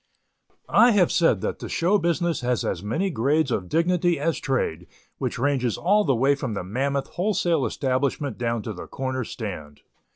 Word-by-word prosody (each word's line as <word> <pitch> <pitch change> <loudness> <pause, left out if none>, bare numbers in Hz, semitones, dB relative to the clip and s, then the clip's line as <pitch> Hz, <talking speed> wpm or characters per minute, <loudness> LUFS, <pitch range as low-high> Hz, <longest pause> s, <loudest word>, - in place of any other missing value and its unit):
I 240 0 +5
have 190 -4 +3
said 170 - +3
that - - -3
the - - -7
show 190 +5 +2
business 170 -2 0
has 125 -1 0
as 85 - -2
many 160 - -1
grades 140 +2 +1
of 90 -6 -2
dignity 175 0 +2
as 160 +3 0
trade, 90 - -2 0.3
which - - -2
ranges 125 -3 0
all 205 +4 +3
the 135 -4 +2
way 135 +4 +3
from 130 -6 -4
the 100 - -3
mammoth 135 +8 -2
wholesale 175 -6 0
establishment 135 +1 -1
down 115 -2 -1
to - - -5
the - - -9
corner 130 -1 -3
stand. 90 -11 -7
140 Hz, 175 wpm, -24 LUFS, 120-170 Hz, 0.3 s, I